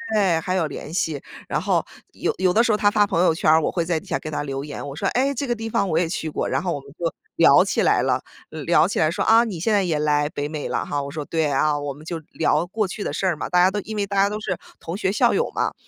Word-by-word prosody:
对， 190 -6 +3
还 185 +3 -2
有 170 -4 +1
联 150 +2 -8
系。 160 -5 -1 0.3
然 - - 0
后 - - +1 0.3
有 - - -1
有 185 -1 +2
的 230 - +4
时 235 - +2
候 210 - +2
他 205 - +4
发 205 0 +3
朋 170 -4 0
友 170 -3 +3
圈 155 - +3
儿， 160 +1 +5
我 - - 0
会 170 - -1
在 165 -1 0
底 - - -18
下 - - -1
给 155 - -7
他 150 - -2
留 135 -1 -4
言， 145 -1 -7
我 140 - -7
说： - - -4
“诶， 270 +3 +2
这 280 +2 -3
个 240 - +1
地 225 -1 -5
方 200 - 0
我 160 -1 +2
也 175 - +1
去 160 -2 -3
过。” - - -2
然 - - -1
后 180 -2 -1
我 145 - -4
们 140 0 -15
就 165 -2 -2 0.2
聊 - - +6
起 - - 0
来 - - +3
了， - - +1 0.3
聊 - - +2
起 - - -2
来 155 0 +3
说： 170 - -1
“啊， 225 +1 +6
你 205 -8 -4
现 215 +7 +1
在 200 -2 +3
也 165 -4 0
来 150 -1 +1
北 145 -1 -3
美 150 -1 -5
了 - - -1
哈？” 145 -1 -2
我 140 - -6
说： 150 0 -5
“对 160 -1 0
啊。” 140 +2 +2 0.2
我 140 - -3
们 145 +3 -14
就 165 0 -4
聊 160 +1 +1
过 210 +2 -1
去 200 +3 -5
的 - - -2
事 - - -2
儿 180 -3 +2
嘛。 - - -5
大 180 - +3
家 180 - +6
都 205 +2 -3
因 215 +2 -7
为 205 - 0
大 200 - -4
家 195 +1 +4
都 210 +1 -4
是 190 -4 -3 0.2
同 165 - -6
学、 190 -1 0
校 205 - +3
友 - - 0
嘛， - - -1
170 Hz, 335 characters per minute, -23 LUFS, 155-205 Hz, 0.3 s, 聊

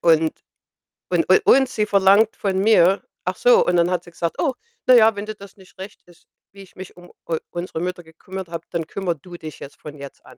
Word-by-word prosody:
und 160 -1 +3 0.8
und - - +1
u - - +8
und 270 -9 +5
sie 210 -3 -2
verlangt 200 +2 +4
von 190 -2 -2
mir 195 -2 +4 0.2
ach - - -2
so, - - +4
und 180 - +1
dann 170 +1 +3
hat 180 -1 -1
sie 175 - -15
gesagt: 170 0 -3
„Oh, 280 -6 0 0.3
na 255 - +6
ja, 225 -3 +6
wenn 205 - -5
dir 215 - -6
das 200 0 -14
nicht 190 -1 -19
recht 195 +3 -10
ist, 175 -1 -23 0.2
wie 195 - -14
ich 190 - -17
mich 185 -1 -10
um 175 0 -15 0.2
u 165 -1 -1
unsere 175 -2 -5
Mutter 180 0 -4
gekümmert 185 +3 -9
habe, 170 0 -7
dann 170 -2 -3
kümmere 180 0 -3
du 175 +4 -13
dich 155 -3 -10
jetzt 140 - -11
von 150 0 -10
jetzt 140 -1 -11
an.“ - - -16
180 Hz, 235 wpm, -21 LUFS, 170-200 Hz, 0.8 s, u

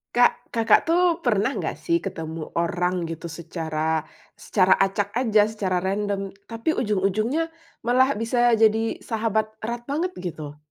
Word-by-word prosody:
Kak, 245 0 +3
Kakak, 230 +6 +4
tuh, 345 0 +3
pernah 225 0 +1
nggak, - - -3
sih, 335 0 0
ketemu 160 - -6
orang, 180 +1 0
gitu, 165 0 -5
secara 160 -1 -3 0.3
secara 190 -2 +3
acak 195 +1 +1
aja, 220 -3 +3
secara 185 -4 -1
random, 195 0 -1 0.2
tapi 230 +7 -1
ujung-ujungnya 215 - 0 0.3
malah 255 +3 +3
bisa 235 +2 +2
jadi 225 0 +2
sahabat 220 -1 -1
erat 235 +2 -4
banget, 315 +8 -2
gitu? 155 -5 -6
210 Hz, 135 wpm, -24 LUFS, 180-240 Hz, 0.3 s, Kakak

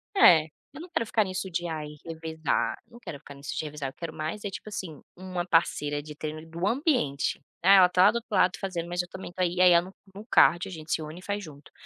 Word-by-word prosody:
É, 170 - +8 0.3
eu 295 - -9
não 355 - -10
quero 230 - -1
ficar 220 0 +2
nisso 185 0 -4
de 175 +1 -2
"Ai, 155 -2 -4 0.2
revezar", 160 -2 -2
eu - - -35
não 235 - -12
quero 150 -11 -8
ficar 145 - -12
nisso 140 +1 -6
de 155 - -2
revezar, 145 -2 -5
eu - - -14
quero 165 -2 -7
mais 155 +7 -4
é, 200 - -2
tipo 215 - -8
assim, 170 -7 -6
uma 180 -1 -4
parceira 145 -3 +1
de 150 0 -10
treino 155 0 -5
de 160 - -12
do 170 +4 -2
ambiente. 245 - 0 0.2
"É, 195 - +8
ela 180 -2 +7
tá 180 0 +4
lá 205 - +7
do - - -9
outro 235 - -8
lado 185 -1 +3
fazendo, 175 -3 -3
mas 175 +1 -1
eu 175 - -9
também 190 -1 -8
tô 185 - -5
aí" 175 0 +1
e 180 - +1
aí 180 -1 +8
ela 170 +1 +5
no 190 - -13 0.2
no 210 +2 -9
cardio 175 -6 +4
a - - -9
gente 155 -1 -8
se 160 - +1
une 155 +3 -7
e - - -15
faz 205 0 -3
junto. 145 -3 -13
175 Hz, 280 wpm, -27 LUFS, 155-190 Hz, 0.3 s, É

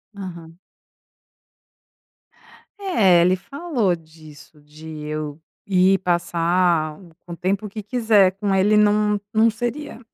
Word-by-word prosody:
Aham. 170 -4 -9 2.2
É, 205 - +3
ele 180 +2 +3
falou 250 - -2
disso, 155 -2 -17
de 150 +2 -14 0.2
eu 150 0 -5 0.3
ir 190 0 +3
passar 170 -2 0 0.3
um 170 - -7
tempo 195 +4 -2
que 215 +2 -7
quiser 215 -4 +3
com 200 0 -2
ele 205 +3 +3
não 210 0 +3
não 220 +1 +4
seria 240 +4 -5
185 Hz, 105 wpm, -21 LUFS, 165-210 Hz, 2.2 s, não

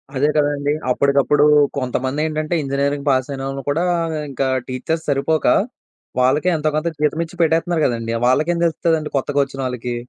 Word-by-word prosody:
అదే 145 +3 +2
కదండీ! 145 -1 +1 0.2
అప్పడికప్పుడు 140 +2 +3 0.3
కొంతమందేంటంటే 150 +5 -2
ఇంజినీరింగ్ 140 +1 -2
పాస్ 130 -2 +2
అయినోళ్లు 135 0 -4
కూడా 160 +5 +1 0.5
ఇంకా 135 0 -1 0.2
టీచర్స్ 160 +6 -3
సరిపోక, 145 +3 0 0.7
వాళ్లకే 140 +7 +2
ఎంతో 155 0 0
కొంత 155 +2 -1
జీతం 150 +1 +1
ఇచ్చి 165 +2 -15
పెట్టేత్తున్నారు 165 0 +1
కదండీ! 115 -2 -1
వాళ్లకేం 155 +7 +2
తెలుత్తదండి 160 -2 0
కొత్తగా 145 +1 -1
వచ్చినోళ్లకి? 125 -3 -4
145 Hz, 130 wpm, -19 LUFS, 135-155 Hz, 0.7 s, అప్పడికప్పుడు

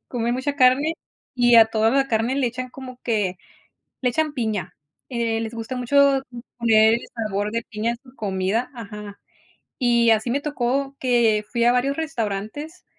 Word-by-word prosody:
comen 240 -1 -1
mucha 270 +3 -2
carne, 275 +4 +4 0.4
y 240 -1 +5
a 225 -1 +8
toda 220 0 +1
la 270 +2 +2
carne 230 +2 0
le 275 -2 +1
echan 255 +2 -4
como 255 -1 -10
que 205 -6 0 0.6
le 255 - +1
echan 310 +4 0
piña, 220 - -3 0.3
eh, 230 -3 -1
les 225 0 -5
gusta 230 +3 -5
mucho 275 +2 +3 0.4
poner 220 -1 +5
el 235 - -1
sabor 210 -3 -2
de 230 +1 -2
piña 215 +2 -2
en 235 - -3
su 255 -2 -18
comida 200 +1 -1
ajá. 210 -3 -9 0.6
Y 235 -2 +3
así 220 +2 +2
me 275 +4 0
tocó 275 -1 -2
que 235 -4 +2
fui 235 -1 +1
a 240 - +5
varios 265 +3 +1
restaurantes, 280 - -4
235 Hz, 170 wpm, -23 LUFS, 220-260 Hz, 0.6 s, a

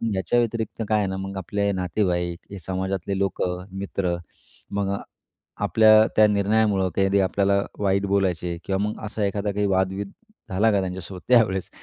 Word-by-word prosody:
याच्या 95 +6 +1
व्यतिरिक्त 115 -1 -2
काय 110 - +3
आहे 100 - 0
ना 95 0 -3
मग, 95 0 -5
आपले 100 +2 -1
नातेवाईक 90 -2 -1
हे 100 - -7
समाजातले 95 +1 -3
लोकं, 90 -2 -1
मित्र 95 -2 -1 0.6
मग 100 -1 -1 0.7
आपल्या 110 0 +6
त्या 110 - +6
निर्णयामुळं 100 -1 +2
कधी 95 0 +3
आपल्याला 100 +1 +2 0.2
वाईट 100 0 +1
बोलायचे 90 -3 0
किंवा 95 - 0
मग 105 - -6
असा 105 0 -3
एखादा 100 +1 -1
काही 105 +1 0
वाद-बिद 95 +1 0 0.4
झाला 105 +4 +3
का 100 - +2
त्यांच्यासोबत 90 0 -6
त्यावेळेस 105 -7 +3
100 Hz, 150 wpm, -24 LUFS, 95-105 Hz, 0.7 s, आपल्या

